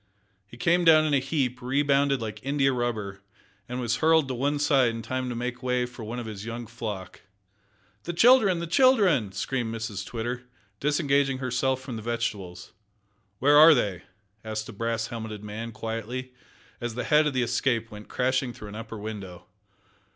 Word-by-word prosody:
He 120 - -13
came 175 +7 +2
down 155 -2 +6
in 150 - 0
a 140 - +4
heap, 135 -2 -1
rebounded 140 0 +2
like 105 -1 -6
india 135 0 +2
rubber, 110 -6 -3 0.5
and 125 +1 -3
was 120 -1 0
hurled 160 -1 +4
to - - -1
one 140 +4 0
side 140 -4 +3
in 115 0 -5
time 130 +1 -3
to 120 - -4
make 125 +1 -4
way 125 -1 0
for 120 -2 -10
one 115 +3 -5
of 120 - -5
his 105 -2 -7
young 115 +1 -5
flock. 110 -5 -7 0.8
"The 175 - -2
children! 220 -2 +5
the 170 - -3
children!" 180 - +4
screamed 115 +4 -2
Mrs 110 -3 -4
Twitter, 120 +3 -4 0.4
disengaging 140 -2 +1
herself 130 0 -1
from 130 -3 -6
the - - -6
vegetables. 105 -6 -4 0.7
"Where 145 +6 +5
are 155 +1 +9
they?" 100 -8 -1 0.4
asked 110 0 -4
a - - -8
brass 115 +1 -2
helmeted 110 -3 -6
man, 110 +2 -6
quietly, 115 +3 -5 0.5
as 120 -2 -4
the 125 - -2
head 150 0 +4
of 150 - -1
the 125 - +2
Escape 120 -1 0
went 105 0 -10
crashing 130 0 0
through 105 - -10
an 100 - -9
upper 115 0 -7
window. 100 -4 -7
125 Hz, 180 wpm, -26 LUFS, 110-140 Hz, 0.8 s, are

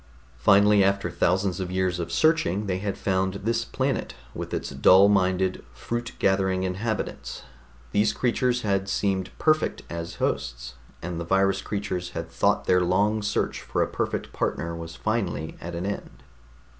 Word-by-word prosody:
Finally, 100 +6 +5
after 100 -2 +1
thousands 95 +2 +1
of 95 -1 -3
years 90 -1 0
of 85 - -4
searching, 105 - +2
they 95 -2 -1
had 100 0 -3
found 95 0 0
this 115 +1 +1
planet 130 +4 -2 0.2
with - - -6
its - - -3
dull 95 +2 +6
minded, 95 -2 +1
fruit 120 - -4
gathering 95 -1 +1
inhabitants. 100 +4 -3 0.5
These 105 +1 +3
creatures 125 0 0
had 100 -2 0
seemed 95 -1 0
perfect 155 0 +1
as 85 0 -5
hosts, - - -2 0.3
and 85 0 -4
the - - -3
virus 95 +3 +2
creatures 100 -4 -3
had 80 0 -5
thought - - +1
their 90 0 +4
long 100 +5 +2
search 105 0 -1
for - - 0
a - - -2
perfect - - -3
partner 85 0 -2
was 85 0 -7
finally 90 -6 -2
at 85 +1 -6
an 85 +2 -3
end. 100 -9 -6
95 Hz, 155 wpm, -25 LUFS, 90-105 Hz, 0.5 s, dull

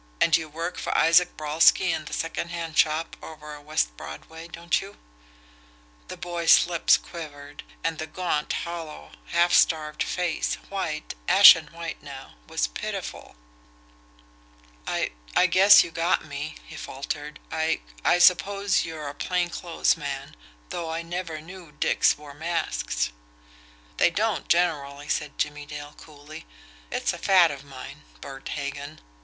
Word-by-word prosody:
And 165 - +5
you 160 -1 -1
work 165 +4 -5
for - - -1
Isaac 175 +2 +4
Brolsky 160 +4 +4
in 155 -1 -3
the - - -9
secondhand 165 -1 -4
shop 155 +1 +2
over 150 -1 -9
on 145 0 -14
West - - 0
Broadway 160 - -9
don't 170 0 -1
you?" 195 +1 -11 1.1
The - - -8
boy's 175 -2 +4
lips 170 -2 +3
quivered, 145 -3 -10 0.2
and 165 -1 -1
the 155 - -4
gaunt, 155 -2 -2
hollow, 165 - -5 0.2
half 175 +1 +2
starved 155 -2 +3
face, 175 -3 -1
white, 165 -6 -4
ashen 180 -4 +9
white 165 -1 -7
now, 140 -2 -10
was - - 0
pitiful. - - -6 1.5
"I - - -1 0.2
I - - +5
guess 190 +3 +7
you 170 - -8
got 165 0 0
me," 145 +1 -6
he 160 - -11
faltered 145 +1 -6
"I 160 0 0 0.2
I - - +4
suppose 195 +2 +3
you're 160 -3 -6
a 140 - -5
plain 175 +3 -1
clothes 170 0 0
man, 140 -3 -6 0.3
though 165 -2 -4
I 165 +1 -3
never 170 -2 -5
knew 175 -1 -12
dicks 150 - +2
wore 145 -1 -12
masks." 145 - -2 0.9
"They - - +5
don't 210 +4 -1
generally," 145 -5 0
said 150 -2 -2
Jimmie 145 0 -3
Dale 145 0 -8
coolly. 150 - -12 0.4
"It's - - 0
a - - -8
fad 180 -4 +5
of 140 -1 -8
mine 135 -2 -10 0.2
Bert 135 - -9
Hagan." 140 +1 -5
160 Hz, 145 wpm, -25 LUFS, 145-170 Hz, 1.5 s, ashen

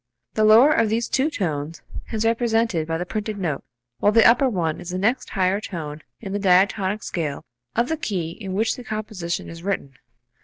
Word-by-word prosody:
The 215 - +1
lower 230 +7 +7
of 225 - +2
these 230 +2 0
two 275 +4 +1
tones 160 - -3 0.3
is 220 -1 -1
represented 225 -7 +1
by 165 0 -1
the 175 - -3
printed 215 +2 -4
note, 165 -8 -2 0.4
while 205 - +4
the 225 +1 +6
upper 245 +3 +5
one 170 -7 -1
is 175 - -8
the 180 - -2
next 225 +7 0
higher 190 +1 +1
tone 155 -6 -6 0.2
in 195 -3 -6
the 205 - -1
diatonic 195 +2 +2
scale 155 -5 -3 0.3
of 235 +2 +2
the 320 - -1
key 180 - -2
in 190 +1 -7
which 220 +3 +1
the 250 - -9
composition 215 -6 -4
is 165 0 -9
written. 180 -8 -3
200 Hz, 195 wpm, -23 LUFS, 170-225 Hz, 0.4 s, lower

